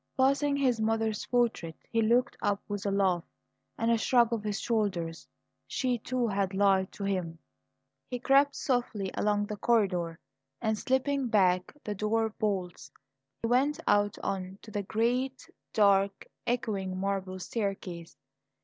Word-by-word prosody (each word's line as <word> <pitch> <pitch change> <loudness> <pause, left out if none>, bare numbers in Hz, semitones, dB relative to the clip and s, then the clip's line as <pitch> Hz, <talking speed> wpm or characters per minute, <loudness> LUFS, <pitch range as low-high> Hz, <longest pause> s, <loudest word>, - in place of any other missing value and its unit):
Passing 275 +2 +3
his 255 -5 +2
mother's 220 -1 0
portrait, 230 -10 0 0.2
he 230 - +2
looked 240 +3 +2
up 205 -1 +1
with 205 -1 -3
a - - +1
laugh 190 -3 +2 0.5
and 230 0 +1
a 230 - +3
shrug 235 -1 +3
of 225 - -1
his 210 -2 -2
shoulders. 190 -8 -1 0.4
She, 250 -2 -1
too, 245 +2 -1
had 195 -2 -1
lied 195 -1 +3
to 200 - -7
him. 180 -4 -2 0.7
He 250 - -2
crept 275 +3 +4
softly 235 -7 -1
along 205 0 +1
the 210 0 -5
corridor, 185 -8 +1 0.4
and, 220 -1 0
slipping 265 +3 0
back 185 -5 +3
the 210 - -3
door 220 +2 0
bolts, 190 -9 -3 0.5
went 265 +6 +2
out 205 0 +3
on 190 0 -3
to 220 - -11
the 205 - -1
great, 245 +6 -1 0.2
dark, 200 -1 +3 0.2
echoing 205 -7 -1
marble 195 -1 -2
staircase. 185 -4 -4
210 Hz, 140 wpm, -30 LUFS, 195-240 Hz, 0.7 s, crept